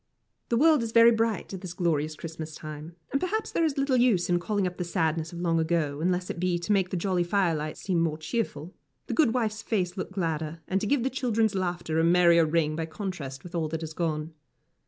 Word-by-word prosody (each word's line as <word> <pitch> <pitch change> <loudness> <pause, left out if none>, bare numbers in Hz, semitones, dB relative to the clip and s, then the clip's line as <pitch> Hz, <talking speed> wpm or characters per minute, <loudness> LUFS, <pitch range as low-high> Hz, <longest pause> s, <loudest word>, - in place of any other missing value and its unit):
The 235 - +2
world 310 0 +5
is 230 -1 -4
very 230 0 +8
bright 225 -3 -1
at 190 - -6
this 180 -2 -7
glorious 155 -3 0
Christmas 160 -1 -7
time, 155 +2 -8 0.2
and 275 - 0
perhaps 435 +4 -1
there 335 - +1
is 305 -4 0
little 275 -2 +2
use 220 -8 +3
in 175 - +3
calling 200 +2 -1
up 180 -1 -3
the 180 - -2
sadness 160 -1 -1
of 175 0 -6
long 165 -2 +1
ago, 160 -3 0
unless 180 +1 0
it - - -7
be 180 -1 +1
to 170 +4 -3
make 190 -3 +2
the 185 - -2
jolly 180 0 +1
firelight 170 -5 0
seem 180 -4 0
more 160 -2 0
cheerful, 160 -1 -3 0.3
the - - -4
good 255 -7 +3
wife's 220 -3 -1
face 185 -6 -1
look 185 - -4
gladder, 165 -3 -2
and 190 +1 0
to 210 - -1
give 275 -1 +2
the 265 - 0
children's 230 -4 +1
laughter 175 -4 -1
a - - +3
merrier 170 -1 +5
ring, 155 -1 +1
by 160 0 -3
contrast 155 -6 -6
with 180 - -11
all 165 -2 0
that 160 +1 -4
is 160 0 -6
gone. 160 -1 -2
175 Hz, 230 wpm, -27 LUFS, 160-215 Hz, 0.3 s, very